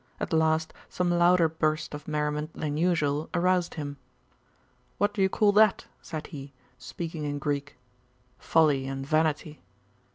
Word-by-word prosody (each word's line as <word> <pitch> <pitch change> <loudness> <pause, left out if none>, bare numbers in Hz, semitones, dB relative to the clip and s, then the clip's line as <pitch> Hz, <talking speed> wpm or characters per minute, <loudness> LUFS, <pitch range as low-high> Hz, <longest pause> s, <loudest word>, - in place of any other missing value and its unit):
At - - -3
last 160 0 +2 0.2
some 180 -1 0
louder 175 0 +4
burst 155 -1 -1
of 150 0 -8
merriment 150 0 -2
than 150 -1 -3
usual 155 -3 +1
aroused 180 0 +1
him. 145 -2 -5 1.0
'What 205 0 +1
do 200 - -2
you 190 - +4
call 205 +1 +3
that?' 210 0 +4 0.2
said 155 -3 -6
he, 140 -3 -9 0.3
speaking 160 +4 -6
in 145 -1 -2
Greek. 145 -1 -3 0.6
'Folly 145 -5 +2
and 135 0 -4
vanity. 155 0 0
155 Hz, 140 wpm, -27 LUFS, 150-175 Hz, 1.0 s, louder